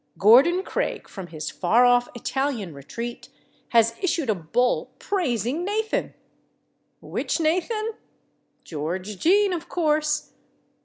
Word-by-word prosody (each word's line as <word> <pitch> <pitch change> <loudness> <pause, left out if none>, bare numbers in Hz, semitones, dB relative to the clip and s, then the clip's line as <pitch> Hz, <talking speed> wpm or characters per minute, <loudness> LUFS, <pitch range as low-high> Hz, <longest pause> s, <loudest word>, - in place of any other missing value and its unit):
Gordon 270 - +6
Craig, - - -3
from 190 -3 -8
his 155 -2 -6
far 225 +7 +3
off 245 0 +4
Italian 240 - -2
retreat, 230 - -7 0.4
has 230 -1 +4
issued 330 - +1
a - - +3
bull 205 +8 0
praising 285 - -1
Nathan! 430 +3 -1 0.9
Which - - -2
Nathan? 370 +8 0 0.7
George 180 +6 -5
Jean, 395 +3 +4
of 340 0 -5
course. 305 -2 0
250 Hz, 110 wpm, -24 LUFS, 210-345 Hz, 0.9 s, Gordon